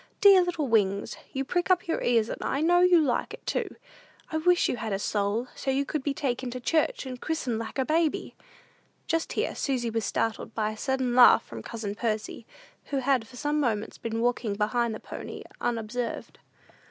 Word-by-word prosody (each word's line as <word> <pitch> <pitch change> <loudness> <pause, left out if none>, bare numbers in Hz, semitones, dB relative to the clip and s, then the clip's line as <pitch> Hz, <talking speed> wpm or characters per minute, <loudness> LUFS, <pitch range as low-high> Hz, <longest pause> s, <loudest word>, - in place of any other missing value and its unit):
Dear 395 -2 +8
little 335 -5 -1
Wings, 200 -4 +1 0.2
you 270 0 -2
prick 355 +6 -1
up 365 -2 +3
your 330 - -1
ears, 230 -2 +2
and - - -5
I 275 - -1
know 350 +2 +4
you 360 -1 +6
like 280 -6 0
it, - - -25
too. - - -2 0.6
I 315 - 0
wish 350 +2 +3
you - - -1
had 220 -2 -3
a - - +1
soul, 205 +4 -1
so - - -4
you 270 +1 +1
could 300 +1 -2
be 285 - -1
taken 255 -3 -2
to 250 +1 -5
church, 310 +3 0
and 255 -1 -7
christened 265 -8 -2
like 230 +3 -6
a 265 - +1
baby." 315 +1 0 0.7
Just 330 -1 -1
here - - -1
Susy 245 -4 -1
was 225 0 -1
startled 220 +2 -2
by 215 -1 0
a - - -7
sudden 260 +1 -1
laugh 245 0 +7
from 115 -1 -8
cousin 215 - -5
Percy, 215 0 -3 0.4
who 280 - -2
had 265 -3 +1
for 260 - -14
some 295 +3 0
moments 225 -6 -1
been 230 0 -3
walking 240 -3 0
behind 220 +2 0
the - - -7
pony - - -8 0.2
unobserved. 235 +1 -3
245 Hz, 200 wpm, -27 LUFS, 225-295 Hz, 0.7 s, Dear